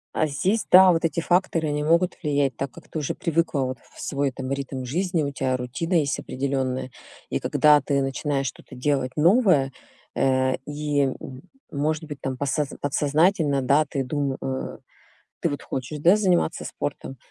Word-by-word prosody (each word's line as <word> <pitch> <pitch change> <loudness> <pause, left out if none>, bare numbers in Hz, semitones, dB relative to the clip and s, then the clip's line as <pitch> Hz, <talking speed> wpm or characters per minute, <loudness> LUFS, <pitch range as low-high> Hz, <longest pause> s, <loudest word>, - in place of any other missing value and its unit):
А 155 - +2
здесь, 185 +10 0
да, 185 0 +8
вот 165 -1 0
эти 165 +1 0
факторы- 175 -2 +1
они 150 0 -1
могут 170 +4 +2
влиять, 140 -5 +1
так 135 -1 -4
как - - -15
ты 160 - -4
уже 145 - -3
привыкла 165 -3 0
вот 130 -2 -3 0.2
в - - -14
свой 140 0 -1
там 130 +1 -6
ритм 135 -1 -3
жизни, 170 +4 0
у 140 - -2
тя 130 -2 -1
рутина 125 +8 -4
есть 150 -4 +1
определённая, 130 -1 -2 0.4
и - - -1
когда 150 -1 +4
ты 140 +1 0
начинаешь 135 +1 -1
что-то 130 - -7
делать 130 -1 0
новое, 170 - +4 0.4
э, 130 0 +2
и, 145 0 -1
м 130 -1 -6 0.3
может 150 +2 -1
быть, 145 -3 -8
там 130 -1 -3
посо 145 +2 0
подсознательно, 145 0 +2
да, 140 +4 +3
ты 135 - -1
дум 140 +1 -1
э, 130 0 -4 0.6
ты 170 - +1
вот 145 -1 -4
хочешь, 135 +4 -5
да, 175 +6 +6
заниматься 185 -5 +1
спортом, 135 -2 -5
145 Hz, 175 wpm, -24 LUFS, 135-160 Hz, 0.6 s, да